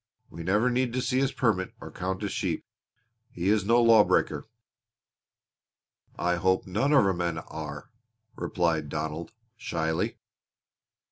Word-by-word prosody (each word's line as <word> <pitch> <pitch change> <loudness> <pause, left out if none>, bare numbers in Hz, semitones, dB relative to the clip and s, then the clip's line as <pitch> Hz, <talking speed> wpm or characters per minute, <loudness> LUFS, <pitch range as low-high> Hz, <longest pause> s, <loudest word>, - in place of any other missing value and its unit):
We 85 - -8
never 105 +8 +2
need 125 -1 0
to 130 - 0
see 130 +1 +1
his 135 -1 +1
permit 105 -7 0
or - - -9
count 95 +1 -3
his - - -2
sheep. - - -2 0.6
He 90 +3 -2
is 105 -2 +2
no 115 +3 +4
lawbreaker!" 115 -2 +4 1.7
"I 90 0 +1
hope 95 +2 +2
none 110 +10 0
of 140 -8 +6
our 95 - +2
men 85 -2 -2
are," 75 -3 -7 0.4
replied 80 -4 0
Donald, 80 +3 -4 0.2
shyly. 80 -6 -2
95 Hz, 135 wpm, -28 LUFS, 85-115 Hz, 1.7 s, of